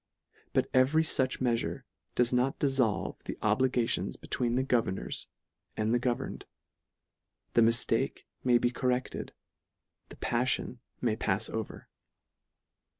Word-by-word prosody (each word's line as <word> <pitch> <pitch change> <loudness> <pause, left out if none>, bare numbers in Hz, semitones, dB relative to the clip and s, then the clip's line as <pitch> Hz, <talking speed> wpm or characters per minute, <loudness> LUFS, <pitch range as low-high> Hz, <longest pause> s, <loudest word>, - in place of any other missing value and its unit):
But - - +2
every 135 +5 +4
fuch 130 -4 +1
meafure 120 -2 0 0.3
does 120 0 +2
not 125 +2 +2
diifolve 135 -7 +1
the - - -4
obligati 120 +2 +2
on - - -3
between 120 -1 -1
the 130 - +2
governors 115 -7 -1 0.5
and 110 +1 +1
the 120 - +3
governed; 120 -1 -2 1.1
the 115 - +5
miftake 115 +1 +2 0.2
may 125 -1 +5
be 120 0 +1
corrected; 125 +1 -1 0.8
the - - -11
palTion 125 0 -1 0.2
may 115 -3 +1
pafs 95 -2 0
over. 110 -1 -5
125 Hz, 120 wpm, -30 LUFS, 115-130 Hz, 1.1 s, the